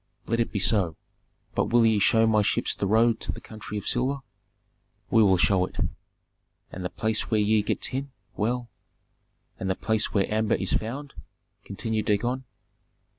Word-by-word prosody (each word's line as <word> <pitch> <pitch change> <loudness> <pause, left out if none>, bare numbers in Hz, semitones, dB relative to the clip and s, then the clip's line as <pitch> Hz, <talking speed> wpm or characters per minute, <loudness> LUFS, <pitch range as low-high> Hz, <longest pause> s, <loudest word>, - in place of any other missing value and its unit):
"Let 115 +1 -1
it 115 - 0
be - - -2
so. 95 -4 +1 0.6
But - - +1
will 120 0 +4
ye 110 -2 +4
show 110 +3 +4
my 110 -1 +4
ships 100 - +1
the 100 - -2
road 115 +3 +3
to - - -3
the - - -8
country 110 -1 -8
of 105 - -5
silver?" 135 +3 0 0.9
"We 115 - +5
will 95 -3 +5
show 90 +2 +3
it." - - -15 1.0
"And 90 - -7
the 90 - -2
place 110 +3 -1
where 110 - +2
ye 105 +1 +3
get 105 - -2
tin? 135 +2 -2 0.3
Well 120 +3 -1 0.5
" - - -43
"And 95 - -2
the 95 - +1
place 110 0 0
where 100 -2 +2
amber 110 0 +2
is 95 - -2
found?" 135 +6 -3 0.5
continued 110 +2 -3
Dagon. 120 +5 0
110 Hz, 180 wpm, -26 LUFS, 100-115 Hz, 1.0 s, We